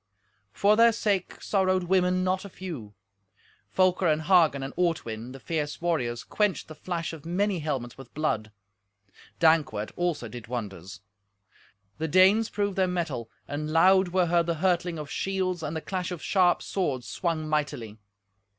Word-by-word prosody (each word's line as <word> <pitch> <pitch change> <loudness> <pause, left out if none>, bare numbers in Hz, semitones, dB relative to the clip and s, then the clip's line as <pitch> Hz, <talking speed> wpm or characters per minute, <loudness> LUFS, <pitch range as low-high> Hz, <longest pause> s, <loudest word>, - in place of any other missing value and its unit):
For 205 - +3
their 230 +1 +6
sake 200 -4 -1
sorrowed 185 -2 +2
women 185 0 +2
not 185 0 0
a 200 - -8
few. 150 - -8 0.7
Folker 185 -1 +2
and 155 0 +2
Hagen 165 -6 +4
and 135 - -5
Ortwin, 125 -10 -2
the 135 - -10
fierce 150 +1 -3
warriors, 135 -9 -1
quenched 210 -3 0
the 155 - -9
flash 170 +1 -4
of 155 -3 -9
many 185 +2 0
helmets 135 -6 -4
with 135 -3 -11
blood. 110 -8 -1 0.9
Dankwart, 160 -10 +2
also, 175 -8 -1
did 115 +1 -9
wonders. 100 -4 -6 1.0
The 160 - -1
Danes 190 +7 +5
proved 205 -2 -2
their 190 -1 +3
mettle, 160 -10 -3 0.2
and 150 +2 -4
loud 185 +4 +5
were 180 0 +2
heard 170 0 +2
the 170 - 0
hurtling 175 0 0
of 150 -2 -7
shields 185 -2 -1
and 155 0 -4
the 160 - -3
clash 185 0 -3
of 175 -4 -6
sharp 180 -3 +3
swords 140 -10 -2
swung 165 -3 -2
mightily. 140 -8 -2
170 Hz, 160 wpm, -27 LUFS, 145-185 Hz, 1.0 s, their